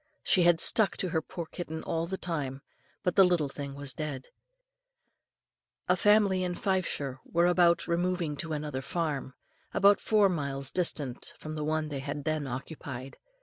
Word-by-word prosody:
She 185 - +3
had 175 -1 +5
stuck 215 +3 +5
to 185 - -1
her 160 -1 0
poor 170 +2 -6
kitten 160 -1 -6
all 165 0 -2
the 190 +2 -3
time; 140 -7 -4 0.4
but 180 - 0
the 195 - +8
little 175 -6 +2
thing 140 0 -6
was 140 -2 -3
dead. 140 -2 -5 1.6
A 180 - +4
family 205 -1 +4
in 180 -1 -2
Fifeshire 170 -10 -1
were 170 +1 +1
about 175 -1 +3
removing 175 -2 0
to 160 +1 -4
another 150 -3 -3
farm, 145 -3 -3 0.4
about 200 +1 +5
four 210 -2 +4
miles 140 -6 -2
distant 150 -8 -1
from 155 - -7
the 155 -1 -3
one 155 0 -1
they 140 -2 -5 0.2
then 155 -2 -1
occupied. 135 0 -7
160 Hz, 160 wpm, -29 LUFS, 140-180 Hz, 1.6 s, the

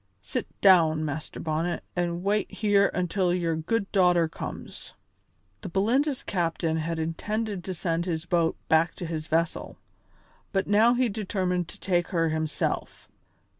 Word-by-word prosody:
Sit - - -3
down, 160 -5 +5
Master 155 +1 -5
Bonnet, 160 +2 -2
an' 175 0 -1
wait 205 +2 0
here 205 -2 +3
until 180 0 +1
your 170 -2 0
good 195 +6 -1
daughter 180 -4 +4
comes." 160 - -8 0.7
The - - -6
Belinda's 250 - +1
captain 165 -3 -1
had 165 +1 -2
intended 200 +5 -2
to 185 - -4
send 170 0 -1
his 165 -1 -2
boat 170 -1 +1
back 160 +1 +3
to 175 - -6
his 160 -1 -4
vessel, 165 +1 -1 0.7
but 195 -2 +1
now 220 +4 +4
he 250 0 +2
determined 185 -4 -1
to 200 - -11
take 175 -3 +1
her 165 -2 +1
himself. 155 -1 -2
175 Hz, 145 wpm, -27 LUFS, 165-200 Hz, 0.7 s, down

